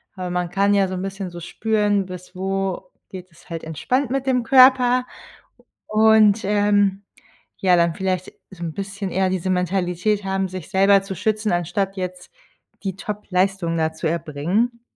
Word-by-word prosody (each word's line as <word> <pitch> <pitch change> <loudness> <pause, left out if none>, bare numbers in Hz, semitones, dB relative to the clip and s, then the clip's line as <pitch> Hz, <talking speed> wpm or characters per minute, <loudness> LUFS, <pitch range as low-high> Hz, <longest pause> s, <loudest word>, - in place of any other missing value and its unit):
aber 185 -2 -5
man 180 -1 -2
kann 200 +2 +2
ja 195 -1 +3
so 185 - -6
'n 180 - -4
bisschen 195 0 -5
so 175 0 -9
spüren, 205 +2 0
bis 180 0 -10
wo 195 0 -3 0.2
geht 185 -2 -9
es 165 - -21
halt 165 -1 -5
entspannt 235 - -1
mit 270 0 -2
dem 250 -2 +2
Körper 255 -1 +5 0.8
und, 220 0 +4
ähm, 205 -1 +2 0.5
ja, 185 -2 +3
dann 170 -1 +2
vielleicht 185 -1 -2 0.2
so 175 -2 -9
'n 165 -2 -4
bisschen 195 0 -5
eher 190 0 +1
diese 185 0 -2
Mentalität 180 +2 0
haben, 195 0 -1
sich 185 -2 -8
selber 195 0 +4
zu 195 -1 -6
schützen, 215 +2 -1
anstatt 180 +3 -1
jetzt 180 - -6 0.5
die 190 -1 -3
Topleistung 195 -4 -1
da 160 0 0
zu 160 0 -3
erbringen. 170 +9 -1
195 Hz, 165 wpm, -21 LUFS, 180-210 Hz, 0.8 s, Körper